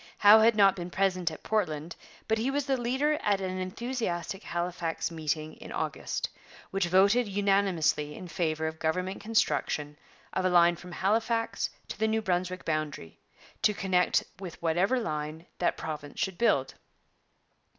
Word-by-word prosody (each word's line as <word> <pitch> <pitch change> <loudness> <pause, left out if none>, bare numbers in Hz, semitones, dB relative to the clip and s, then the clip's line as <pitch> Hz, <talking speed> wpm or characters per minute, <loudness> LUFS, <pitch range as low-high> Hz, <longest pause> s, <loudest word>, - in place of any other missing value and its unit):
Howe 210 +2 +8
had 225 +1 +5
not 200 -2 +5
been 175 -1 -5
present 185 -2 +1
at 155 - -10
Portland, 170 -7 -1 0.3
but 220 0 +1
he 240 +4 0
was 280 0 -1
the 275 -1 +1
leader 265 +5 0
at 205 -2 +2
an 185 -1 -3
enthusiastic 195 -2 -3
Halifax 175 -2 -3
meeting 155 -1 -2
in - - -10
August, - - -2 0.4
which 195 -2 0
voted 200 +6 +4
unanimously 195 -7 +1
in 185 - -8
favour 160 -2 -1
of 160 0 -4
government 185 +4 -1
construction 160 -8 0 0.4
of 185 - 0
a 185 - +3
line 175 -1 +5
from 180 +1 -11
Halifax 225 +5 0 0.2
to - - -7
the 220 - +2
New 220 0 0
Brunswick 185 -1 -1
boundary, 155 - -3 0.4
to 210 -1 +3
connect 185 -2 +2 0.2
with 180 -4 -8
whatever 180 +10 +2
line 155 -5 -4
that 175 - +1
province 150 -2 -6
should 190 -2 -2
build. 135 - +2
185 Hz, 155 wpm, -29 LUFS, 160-215 Hz, 0.4 s, Howe